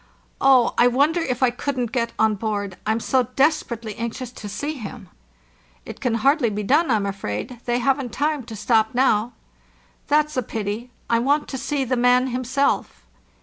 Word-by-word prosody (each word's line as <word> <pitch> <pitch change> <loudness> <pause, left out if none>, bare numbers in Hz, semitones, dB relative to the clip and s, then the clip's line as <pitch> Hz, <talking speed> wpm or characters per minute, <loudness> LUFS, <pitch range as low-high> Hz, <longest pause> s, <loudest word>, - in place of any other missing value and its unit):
"Oh, 260 -3 +5
I 240 - +7
wonder 285 +7 +2
if 260 -6 -1
I 250 - +4
couldn't 250 -2 -3
get 235 -3 -1
on 220 0 +3
board? 205 -2 -3
I'm 220 +1 +1
so 255 0 +1
desperately 255 -7 +1
anxious 235 +2 -5
to 210 -4 -8
see 285 +9 -3
him." 220 - -9 0.8
"Tt - - -8
can 245 -3 0
hardly 270 +2 +3
be 210 0 -3
done, 295 +9 +3
I'm 215 -4 +2
afraid; 195 - -4
they 240 0 +1
haven't 260 0 0
time 295 +3 0
to 225 - -8
stop 220 +1 +1
now." 245 -2 +2 0.7
"That's 300 +1 +2
a 255 - +1
pity. 220 +1 -4 0.2
I 230 - +2
want 285 +5 +1
to 265 - -4
see 275 +1 -1
the 255 0 0
man 250 +1 +3
himself." 255 +2 -1
245 Hz, 175 wpm, -22 LUFS, 220-270 Hz, 0.8 s, I